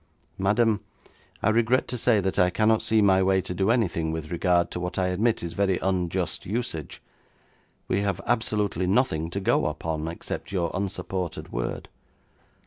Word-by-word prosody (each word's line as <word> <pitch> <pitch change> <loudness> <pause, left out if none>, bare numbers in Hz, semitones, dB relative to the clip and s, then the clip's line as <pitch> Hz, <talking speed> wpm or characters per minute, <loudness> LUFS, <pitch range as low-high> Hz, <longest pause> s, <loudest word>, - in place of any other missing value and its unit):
'Madam, 105 +2 +2 0.6
I - - +4
regret 115 +3 +2
to 125 - -2
say 115 -2 +3
that 95 0 -1
I 90 - +5
cannot 110 +3 +2
see 110 -1 +3
my 95 -1 +5
way 95 0 +3
to 90 - -5
do 95 +3 0
anything 90 -9 +1
with 80 0 -5
regard 85 0 +2
to - - -4
what 90 0 -4
I 90 -1 +1
admit 105 +4 +1
is 85 - -4
very 95 -2 +1
unjust 90 -1 -1
usage. 95 - -4 0.8
We 95 - +1
have 100 -3 -1
absolutely 105 -6 0
nothing 90 -7 +1
to 100 - -3
go 95 - +2
upon 80 -1 -3
except 85 +3 -6
your 90 -4 -1
unsupported 95 -2 -3
word. - - -3
95 Hz, 165 wpm, -26 LUFS, 85-105 Hz, 0.8 s, I